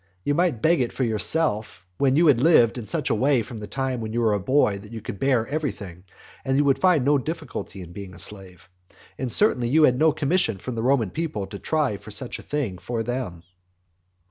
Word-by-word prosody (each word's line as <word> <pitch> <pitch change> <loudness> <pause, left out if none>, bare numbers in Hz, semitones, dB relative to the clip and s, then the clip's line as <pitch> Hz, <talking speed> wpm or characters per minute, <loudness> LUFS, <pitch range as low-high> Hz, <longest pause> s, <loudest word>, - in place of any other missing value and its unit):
You 145 - 0
might 165 -8 0
beg 165 -2 +3
it 120 - -1
for 130 - -2
yourself, 110 - +1
when 135 -1 +3
you 170 +3 +4
had 135 -6 +4
lived 130 -7 +4
in 110 - -8
such - - -1
a - - +3
way 125 +2 +2
from 110 +1 -9
the 105 - -7
time 130 -2 -3
that 110 -1 -5
you 120 +1 -1
were 110 -2 +2
a 105 - 0
boy 105 -1 +2
that 105 +2 -13
you 115 - -6
could 100 -2 -7
bear 130 -5 +2
everything, 105 - -5 0.4
and 135 +1 +1
would 140 -2 +2
find 160 -5 +3
no 145 0 +3
difficulty 135 - -6
in 85 0 -12
being 95 -2 -9
a - - -13
slave; 95 -3 -6 0.5
but 130 - -2
certainly 125 - +2
you 155 +4 +4
had 125 -3 +4
no 160 0 +5
commission 150 - 0
from 125 +7 -6
the 115 - -3
Roman 120 -5 +1
people 155 -12 -3
to 100 +1 -9
try 150 -10 0
for 110 - -13
such 115 +4 -3
a - - -9
thing 125 -12 -3
for 115 +1 -3
them. 115 -8 -4
125 Hz, 225 wpm, -24 LUFS, 105-145 Hz, 0.5 s, no